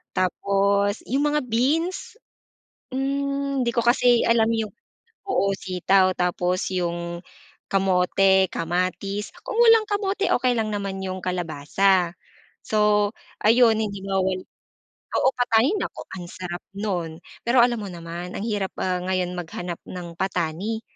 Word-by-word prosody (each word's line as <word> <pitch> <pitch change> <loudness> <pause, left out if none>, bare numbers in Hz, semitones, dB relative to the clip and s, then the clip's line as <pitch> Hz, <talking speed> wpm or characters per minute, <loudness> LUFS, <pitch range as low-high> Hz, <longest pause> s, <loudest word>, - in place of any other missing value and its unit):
tapos 200 +2 +1
'yung 275 +3 +1
mga 300 0 +1
beans, 305 - 0 0.8
hmm, 275 0 -1
hindi 235 - +1
ko 235 - +2
kasi 240 0 +4
alam 230 -1 +4
'yung 220 -2 -2 0.6
oo 200 - +2
sitaw, 185 0 +2
tapos 180 +1 0
'yung 170 -1 -2 0.5
kamote, 190 0 +3
kamatis, 185 +4 -2
kung 460 - -4
walang 455 -1 +7
kamote 400 -1 0
okey 250 0 +1
lang 220 -1 0
naman 200 -2 -3
'yung 185 0 -4
kalabasa. 180 +1 +1 0.5
So 210 -1 +2 0.3
ayon 225 +1 +6
hindi 200 -2 -3
mawala 190 -1 0 0.7
oo 265 - +3
patani 245 - +3
nako - - -5 0.2
ang 175 - -7
sarap 175 -1 -6
nun. 175 -6 -3 0.3
Pero 240 +1 +5
alam 240 -1 +2
mo 205 - -5
naman 170 +1 -7
ang - - -4
hirap, 205 -4 -2
ah, 180 -1 0
ngayon 185 -1 -1
maghanap 175 0 -5
ng 175 -2 -8
patani, 190 +4 -2
195 Hz, 130 wpm, -24 LUFS, 180-235 Hz, 0.8 s, walang